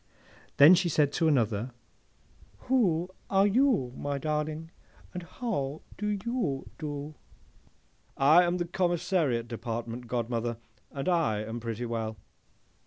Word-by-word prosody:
Then 145 +5 +9
she 180 -1 +3
said 145 -2 +2
to 165 +1 +2
another, 120 -4 +1 0.9
'Who 185 -9 +1 0.2
are 195 0 +4
you, 210 - +2
my 145 0 -3
darling, 155 +2 -3 0.4
and 180 - -4
how 160 - -4
do 210 - -3
you 210 - -2
do?'—'I 150 +1 -1
am 175 +1 +1
the 175 - -1
Commissariat 170 - 0
Department, 115 +1 -5
godmother, 120 -1 -2 0.3
and 135 +2 -5
I 155 - +1
am 115 +2 -5
pretty 115 +1 -4
well! 110 -2 -3
150 Hz, 115 wpm, -29 LUFS, 120-175 Hz, 0.9 s, Then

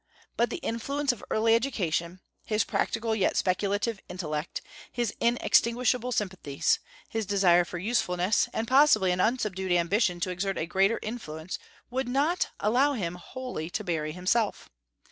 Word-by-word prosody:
But 235 0 +2
the - - -3
influence 275 +5 -1
of 245 - -9
early 225 +1 +3
education, 185 -8 0 0.2
his 215 0 +1
practical 225 0 -1
yet 195 - +1
speculative 200 +3 0
intellect, 155 -4 -4 0.3
his 240 -2 -1
inextinguishable 240 +1 +2
sympathies, 180 - 0 0.3
his 225 -3 -3
desire 185 -3 +4
for 175 - -6
usefulness, 185 -1 +1
and 225 - -2
possibly 255 -8 +5
an 180 - -1
unsubdued 200 -5 0
ambition 175 +1 +2
to 185 - 0
exert 195 +2 -2
a - - -1
greater 195 +6 +2
influence 180 -7 -5 0.3
would 260 0 -1
not 290 +8 +1
allow 255 +7 +3
him 180 -9 -2
wholly 180 -2 -6
to - - -3
bury 155 -3 -2
himself. 195 +6 0
205 Hz, 145 wpm, -28 LUFS, 180-235 Hz, 0.3 s, possibly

